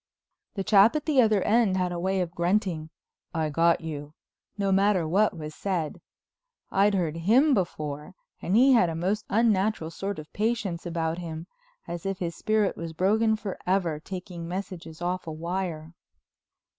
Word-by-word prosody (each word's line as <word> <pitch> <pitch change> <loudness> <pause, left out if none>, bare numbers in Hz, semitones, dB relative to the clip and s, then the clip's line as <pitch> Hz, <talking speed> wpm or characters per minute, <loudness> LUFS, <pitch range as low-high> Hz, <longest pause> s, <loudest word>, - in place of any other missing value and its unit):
The 195 - -2
chap 205 +5 +5
at 300 - -1
the 290 -5 +4
other 215 -4 +3
end 215 -3 +3
had 180 -1 0
a 175 - -3
way 190 +1 0
of 175 -2 -3
grunting, 175 -3 0 0.5
"I 155 -2 0
got 165 +3 +3
you," 150 -2 -7 0.4
no 200 -1 0
matter 195 -3 +3
what 190 +2 +2
was 155 -1 -6
said. 175 -6 -3 0.7
I'd 200 +1 +3
heard 165 -4 -1
him 245 - +4
before 150 - -3 0.3
and 185 - 0
he 260 +4 +6
had 205 -8 +4
a 165 - -3
most 190 +6 -1
unnatural 210 -5 +1
sort 195 +3 -4
of 155 0 -10
patience 210 -6 -1
about 165 0 -2
him, 165 -1 -6 0.4
as 170 -1 -5
if 195 -1 -2
his 170 -2 -3
spirit 215 -2 +1
was 165 -1 -6
broken 220 +6 +2
forever 185 -5 -2
taking 180 0 -7
messages 175 -3 -6
off 180 0 -2
a - - -3
wire. 165 -1 -4
185 Hz, 165 wpm, -27 LUFS, 165-205 Hz, 0.7 s, he